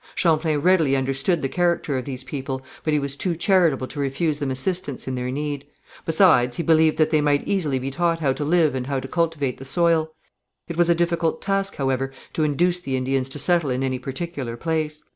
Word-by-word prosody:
Champlain 160 -2 +2
readily 160 -3 +3
understood 135 +5 0
the - - +1
character 170 -2 0
of 130 -1 -3
these 130 -2 -5
people, 130 0 -5 0.2
but 155 - 0
he 150 - +3
was 140 -1 -2
too 175 +3 -1
charitable 170 -6 +2
to 145 - -8
refuse 145 +2 -1
them 140 -3 -2
assistance 140 +1 -1
in 130 - -2
their 125 0 -3
need; 145 +1 -3 0.4
besides 160 -8 +4
he 170 - -1
believed 160 -1 +4
that 155 -1 +2
they 155 - +3
might 145 -1 +1
easily 160 -9 0
be 130 +1 -4
taught 170 +2 0
how 140 -4 +1
to 150 - -4
live 155 -1 +3
and 130 -1 -3
how 135 -1 -1
to 130 - -7
cultivate 155 -4 -1
the - - -8
soil. 165 +2 +1 0.6
It 170 - -5
was 175 0 +3
a 170 - +5
difficult 170 -1 0
task, 195 0 -1
however, 135 -1 -1 0.2
to 155 - 0
induce 175 +4 +2
the 135 -7 -3
Indians 130 0 -1
to 135 - -5
settle 170 -2 +2
in 130 +1 -1
any 130 -1 -1
particular 135 -2 -5
place. 155 0 -2
150 Hz, 215 wpm, -23 LUFS, 135-170 Hz, 0.6 s, a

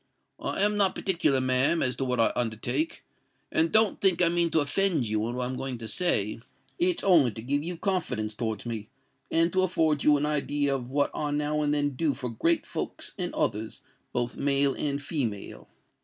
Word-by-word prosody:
I 195 - -1
am 210 0 +2
not 195 -2 +2
particular, 165 -8 +2
ma'am, 130 +6 +2
as 125 -2 +1
to 135 - -1
what 125 -1 -1
I 115 - +5
undertake; 120 - -2 0.5
and 330 0 +2
don't 220 -1 +4
think 185 -3 +2
I 175 -2 +5
mean 170 0 +1
to 160 - +2
offend 155 - 0
you 110 +1 -1
in 120 - -4
what 125 0 -1
I'm 130 +1 -3
going 130 -1 -4
to 115 -1 -8
say—it's 175 - -1
only 170 -10 +5
to 110 0 -8
give 140 +4 0
you 170 +2 -5
confidence 160 - -2
towards 110 -1 -4
me, 110 -3 -5 0.4
and 165 +1 +2
to 185 - +3
afford 160 -5 +1
you 150 -1 +5
an 145 - -1
idea 145 -1 0
of 125 -2 -4
what 140 +1 0
I 150 - -2
now 150 +1 -1
and 145 -1 +1
then 145 -1 +1
do 140 +1 -1
for 125 -2 -5
great 165 +9 +1
folks - - -5
and - - -2
others, 110 +2 -2 0.3
both 120 0 -2
male 140 -1 +2
and 140 -1 -2
female. 135 - -4
145 Hz, 200 wpm, -27 LUFS, 125-170 Hz, 0.5 s, I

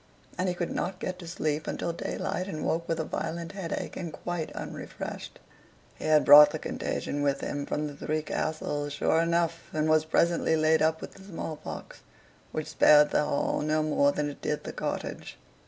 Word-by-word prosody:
And 185 +1 0
he 180 - -2
could 175 -1 -3
not 185 0 -2
get 185 0 -4
to 175 - -9
sleep 155 -2 -2
until 170 - -2
daylight, 180 +2 -3
and 155 -6 -4
woke 165 +1 -1
with 165 0 0
a - - 0
violent 165 +2 -4
headache, 195 -4 -4
and 170 -3 -5
quite 175 0 -4
unrefreshed. - - -7 0.6
He - - -9
had 155 -1 +4
brought 150 0 +10
the - - -4
contagion 145 - -3
with 140 -1 +1
him 145 0 -3
from 150 - -1
the 145 -1 -6
"Three 155 +2 -2
Castles" 150 -2 -2
sure 160 +2 +2
enough, 170 0 0
and 155 0 0
was 155 0 +4
presently 170 0 +2
laid 155 0 +3
up 160 0 +2
with - - -7
the 190 - -14
smallpox, 165 -5 -7 0.5
which 155 - -3
spared 150 0 +6
the - - +3
hall 140 - 0
no 155 +1 +1
more 145 -2 +3
than 150 0 -1
it - - -14
did 150 - -2
the - - -6
cottage. - - -4
155 Hz, 190 wpm, -28 LUFS, 150-170 Hz, 0.6 s, brought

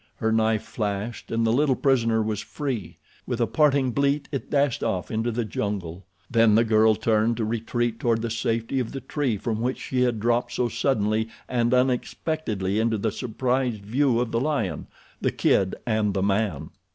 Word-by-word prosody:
Her 110 - -1
knife 110 -1 +2
flashed, 105 +1 -4
and 115 0 0
the 110 - +2
little 140 +1 +3
prisoner 115 -5 +2
was 105 -1 -2
free. 125 - -4 0.3
With 120 - -2
a 120 - +3
parting 135 +2 +2
bleat 140 +3 +1
it 140 - -4
dashed 140 -3 +1
off 90 -2 -2
into 115 +1 0
the 115 0 -2
jungle. 95 -4 -4 0.2
Then 115 -3 +4
the 115 - +5
girl 110 -1 +4
turned 110 +1 +1
to 115 - -1
retreat 115 +1 -1
toward 115 -2 +1
the 115 - -2
safety 115 +3 -1
of 120 -3 -3
the 135 - -4
tree 135 -8 -1
from 110 +2 -3
which 125 +2 -1
she 130 -1 -2
had 120 -3 +1
dropped 120 +2 0
so 120 -1 0
suddenly 110 -4 0 0.2
and 120 -1 +1
unexpectedly 125 - 0
into 110 0 +1
the 110 +1 -1
surprised 125 -1 -1
view 125 +2 +2
of 120 -2 -1
the 115 - +1
lion, 140 -9 -1 0.3
the - - +1
kid 95 -1 +2
and 110 -3 0
the 95 - +1
man. 100 -7 0
115 Hz, 185 wpm, -25 LUFS, 110-125 Hz, 0.3 s, the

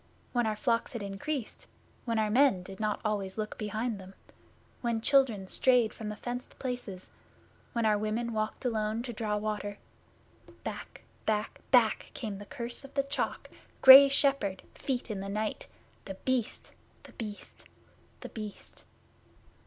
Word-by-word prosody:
When 240 -2 +2
our 215 - 0
flocks 230 +2 0
had 235 -4 -4
increased; 215 +6 -4 0.4
when 230 -2 0
our 215 -1 +1
men 245 -6 +4
did 190 +1 -10
not 215 -1 0
always 200 -2 -1
look 215 -1 -3
behind 215 +1 -2
them; 190 0 -12 0.7
when 235 -2 0
children 230 -6 +3
strayed 245 0 +3
from 215 -2 -6
the 210 - -4
fenced 245 +3 -6
places; 245 -8 -5 0.6
when 235 -1 +1
our 210 -1 +3
women 225 +2 -1
walked 215 +4 -2
alone 220 -1 0
to 245 -1 -5
draw 210 -1 -1
water 210 -1 -3 0.9
back, - - -7 0.2
back, 215 -1 -1
back 235 -4 +4
came 210 -4 -5
the 205 - -10
Curse 240 -2 -5
of 275 0 -13
the 275 - +2
Chalk, 275 +1 -3 0.4
Grey 270 +1 +12
Shepherd, 275 -9 +1
Feet 250 -4 -3
in 205 - -3
the 195 +1 -5
Night 215 +1 -3 0.4
The 195 - -6
Beast, 250 +2 -2 0.3
The - - -14
Beast, 210 -3 -8 0.6
The - - -7
Beast! 215 -2 -9
220 Hz, 155 wpm, -30 LUFS, 210-245 Hz, 0.9 s, Grey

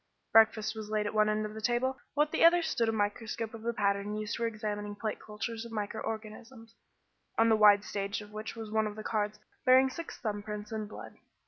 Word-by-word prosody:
Breakfast 220 0 +5
was 215 -1 -6
laid 215 -1 0
at 205 - -2
one 215 0 +4
end 215 0 0
of 210 - -6
the 220 - -7
table, 245 +3 0 0.2
while 295 +1 +4
at 300 - -18
the - - +2
other 340 +1 +7
stood 235 -8 +1
a - - +2
microscope 220 +1 -2
of 225 - -8
the 235 +1 -1
pattern 200 -1 0
used 215 +1 -3
for 235 0 0
examining 210 -2 -4
plate 215 +1 -3
cultures 220 +2 -5
of 235 - -9
micro 215 0 -3
organisms, 225 +2 -7 0.6
on 225 0 +5
the 220 - +6
wide 210 -1 +7
stage 200 0 -3
of 210 0 -11
which 215 +2 -6
was 220 -2 -7
one 220 0 +2
of 210 - -6
the 215 - -7
cards 210 -1 -1 0.3
bearing 260 +1 +6
six 335 +4 -7
thumb 210 -2 -3
prints 210 0 -6
in 215 -1 -3
blood. 215 - -10
215 Hz, 230 wpm, -31 LUFS, 210-230 Hz, 0.6 s, other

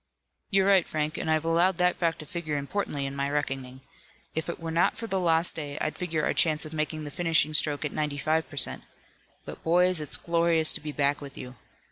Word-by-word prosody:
"You're 195 -1 +3
right, 195 -3 +4
Frank, 155 +1 -2
and - - -3
I've 155 0 +1
allowed 170 +2 +3
that 180 0 +3
fact 165 -1 0
to 155 - -9
figure 155 -2 -3
importantly 140 -1 -3
in 135 0 -5
my 140 0 -1
reckoning. 135 -3 -3 0.5
If 160 +1 -3
it 170 - -4
were 165 -1 -5
not 165 +2 +2
for 230 - -4
the 195 -4 0
lost 165 -1 +2
day 145 -2 -5
I'd 155 - -2
figure 165 -4 -2
our - - +1
chance 155 -1 +3
of 155 - -9
making 155 0 -2
the 145 - -7
finishing 165 -1 +2
stroke 150 -1 +1
at 150 - -3
ninety 150 -2 -2
five 155 +3 0
per 145 - -11
cent. - - +2 0.6
But - - -9
boys, 180 0 +3
it's 150 - -2
glorious 170 -1 +3
to - - -4
be 150 0 -5
back 145 0 +1
with 140 -2 -9
you. 125 0 -7
155 Hz, 225 wpm, -27 LUFS, 145-170 Hz, 0.6 s, right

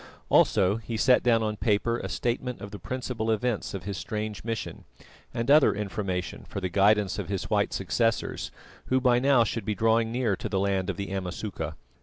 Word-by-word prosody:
Also 95 +2 +4
he 115 0 -5
set 125 +3 +5
down 115 -2 +3
on 105 -1 -1
paper 115 +2 +1
a - - -5
statement 125 +1 -2
of 100 - -8
the 105 - -8
principal 125 -3 -3
events 110 -1 -1
of 95 - -6
his 100 0 -4
strange 105 +1 -4
mission, 115 -1 -4 0.5
and 115 +3 0
other 150 -6 +6
information 100 -3 -3
for - - -4
the 95 -1 -2
guidance 100 +1 +3
of - - -5
his 100 +1 -3
white 105 -1 +2
successors, 110 +6 -1 0.4
who 130 - +2
by 125 -1 +4
now 135 -2 +4
should 115 0 -3
be 105 +1 -2
drawing 115 +2 +2
near 120 -4 +1
to - - -5
the 95 - 0
land 95 -1 0
of - - -3
the 100 -1 -4
Amasuka. 90 -4 -4
105 Hz, 195 wpm, -27 LUFS, 100-115 Hz, 0.5 s, other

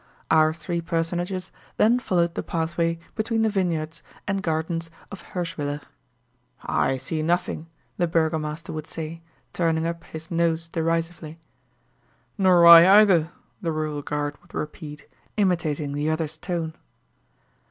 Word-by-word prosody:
Our 155 0 +5
three 170 +1 -3
personages 175 +3 -2 0.3
then 235 +3 +4
followed 175 -7 +1
the - - -2
pathway 165 0 -1 0.2
between 225 0 0
the 220 - +3
vineyards 170 -6 -1 0.3
and 195 -1 0
gardens 165 0 -2 0.2
of 200 - -8
Hirschwiller. 150 -5 -4 0.8
"I 135 - +1
see 155 +5 -3
nothing," 170 0 -1 0.3
the 175 - +2
burgomaster 160 -1 -1
would 155 0 -5
say, 165 +1 -6 0.3
turning 165 -2 +1
up 170 0 -3
his 160 +1 -9
nose 165 -1 +1
derisively. 165 -1 -2 1.0
"Nor 185 -4 +5
I 170 +5 +10
either," 175 -6 +4 0.3
the 170 -4 -1
rural 155 -2 -2
guard 145 0 -3
would 175 - -17
repeat, 150 -1 -6 0.3
imitating 160 -7 0
the 145 +2 -1
other's 160 -1 -1
tone. 165 -1 -3
165 Hz, 130 wpm, -24 LUFS, 155-175 Hz, 1.0 s, I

